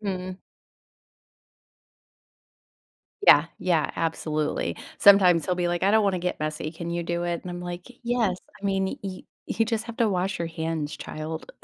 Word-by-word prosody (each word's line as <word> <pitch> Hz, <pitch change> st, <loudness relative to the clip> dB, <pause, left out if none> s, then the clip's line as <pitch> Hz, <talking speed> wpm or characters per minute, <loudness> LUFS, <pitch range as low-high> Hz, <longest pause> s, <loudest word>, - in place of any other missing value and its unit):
Mhm. 185 Hz, -2 st, -4 dB, 2.9 s
Yeah, -, -, +8 dB
yeah, 170 Hz, -4 st, +1 dB
absolutely. 155 Hz, -, -1 dB, 0.2 s
Sometimes 185 Hz, -5 st, +7 dB
he'll 180 Hz, -, +1 dB
be 175 Hz, -1 st, 0 dB
like, 175 Hz, 0 st, -1 dB
"I 195 Hz, -, +4 dB
don't 220 Hz, 0 st, +4 dB
wanna 195 Hz, -2 st, +1 dB
get 180 Hz, +1 st, -2 dB
messy. 155 Hz, 0 st, -3 dB
Can 170 Hz, +1 st, -6 dB
you 170 Hz, 0 st, -1 dB
do 170 Hz, +1 st, -2 dB
it?" 175 Hz, -1 st, -2 dB
And 180 Hz, -, -6 dB
I'm 175 Hz, 0 st, -5 dB
like, 175 Hz, 0 st, -6 dB, 0.2 s
"Yes. 235 Hz, -6 st, +1 dB, 0.2 s
I -, -, -11 dB
mean, 195 Hz, -1 st, 0 dB
yo 190 Hz, -2 st, -5 dB, 0.3 s
you 225 Hz, -, +1 dB
just 225 Hz, -1 st, -1 dB
have 230 Hz, 0 st, -8 dB
to 230 Hz, -, +3 dB
wash 190 Hz, 0 st, -1 dB
your 170 Hz, -, -2 dB
hands, 160 Hz, -2 st, -3 dB
child." 155 Hz, +1 st, -6 dB
180 Hz, 165 wpm, -26 LUFS, 165-195 Hz, 2.9 s, Yeah